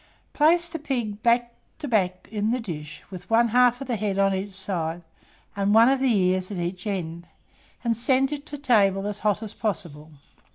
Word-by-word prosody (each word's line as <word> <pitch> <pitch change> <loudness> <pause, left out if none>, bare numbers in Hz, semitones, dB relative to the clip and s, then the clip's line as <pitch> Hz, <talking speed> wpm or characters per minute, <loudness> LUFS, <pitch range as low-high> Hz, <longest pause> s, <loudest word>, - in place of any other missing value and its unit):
Place 335 +3 +4
the 330 - -6
pig 235 -8 -3
back 240 0 +2 0.2
to 300 - -6
back 185 -6 0
in 210 0 -1
the 250 +2 0
dish, 155 -9 -7
with 180 -1 -9
one 230 +1 +4
half 245 +2 +3
of 275 - -6
the 245 - -1
head 200 -2 -2
on 195 0 +3
each 195 +1 -4
side, 175 -3 -2 0.5
and 200 +1 +1
one 230 +2 +7
of 270 0 +2
the 265 0 +2
ears 185 -3 +1
at 200 - -5
each 175 +2 -4
end, 170 -4 -4 0.6
and 235 -1 +1
send 265 +4 +2
it 295 0 -6
to 290 - -6
table 200 -8 +2
as 205 0 -4
hot 210 +1 0
as 215 -1 -7
possible. 165 -8 -4
210 Hz, 200 wpm, -25 LUFS, 185-245 Hz, 0.6 s, one